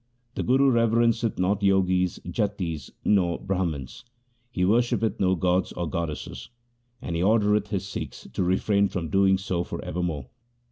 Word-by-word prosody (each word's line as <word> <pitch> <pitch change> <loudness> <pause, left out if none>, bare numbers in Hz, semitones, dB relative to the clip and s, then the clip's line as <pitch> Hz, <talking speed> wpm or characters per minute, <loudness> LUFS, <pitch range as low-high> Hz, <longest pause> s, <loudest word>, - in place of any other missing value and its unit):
The - - -3
Guru 135 +2 +3
reverenceth 115 -1 +2
not 95 +3 +1
Jogis, 95 -2 +2
Jatis, 90 - -3 0.2
or 90 -5 +2
Brahmans. 85 -9 -3 0.5
He 90 -7 0
worshippeth 115 +1 +1
no 95 -1 +3
gods 90 +1 0
or 85 - -3
goddesses, 80 0 -5 0.5
and 85 - -3
he 85 - 0
ordereth 105 +1 +3
his 100 -2 -3
Sikhs 80 -9 -7
to - - -2
refrain 100 +3 +2
from 85 -4 -4
doing 95 +2 +4
so 95 -2 -2
for - - -6
ever 90 - -3
more. 80 -6 -2
95 Hz, 150 wpm, -26 LUFS, 85-105 Hz, 0.5 s, doing